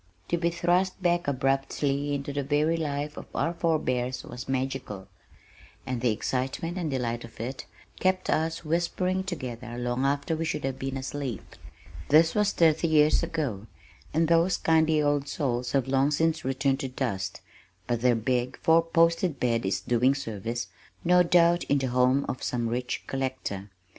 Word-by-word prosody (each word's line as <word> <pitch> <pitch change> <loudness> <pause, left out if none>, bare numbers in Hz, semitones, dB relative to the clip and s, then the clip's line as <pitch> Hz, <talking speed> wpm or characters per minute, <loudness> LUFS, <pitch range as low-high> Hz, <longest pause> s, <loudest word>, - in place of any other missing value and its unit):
To 170 - +1
be 170 0 +1
thrust 175 +2 +1
back 175 -1 +2
abruptly 135 +1 0
into 140 0 -4
the 140 - -1
very 150 +4 +1
life 150 -2 -3
of - - -8
our 165 - 0
forebears 130 -7 -1
was 120 +2 -8
magical, 130 -7 -3 0.8
and 125 -2 -3
the 125 - +2
excitement 130 - -2
and 165 -3 -2
delight 120 -3 -2
of 115 - -13
it 125 +2 -5 0.3
kept 185 0 +1
us 160 +1 0
whispering 180 +3 0
together 125 -9 -6
long 120 +1 -1
after 140 +3 0
we 160 - -2
should 150 -2 -2
have 135 -1 -3
been 135 0 -3
asleep. 135 -3 -5 0.5
This 160 +2 +5
was 210 -1 +2
thirty 160 0 +3
years 155 -1 +4
ago, 120 -11 -3 0.4
and 160 +2 +2
those 170 +2 +3
kindly 160 -1 +3
old 145 -1 +1
souls 125 -5 -2
have 135 -2 +1
long 135 +1 +3
since 160 +1 +1
returned 135 +1 0
to 135 - -2
dust, 100 -8 -3 0.4
but 120 -2 -1
their 125 -1 +4
big 125 +3 -1
four 165 +1 +4
posted 165 -1 +2
bed 115 -4 +1
is 95 0 -1
doing 125 +5 +2
service, 115 -3 -4 0.4
no 180 +1 +5
doubt, 175 0 +4
in 145 - +2
the 130 -2 -1
home 125 +2 +3
of 130 - -4
some 120 -2 -1
rich 125 +1 -3
collector. 130 -7 -4
140 Hz, 165 wpm, -27 LUFS, 125-165 Hz, 0.8 s, This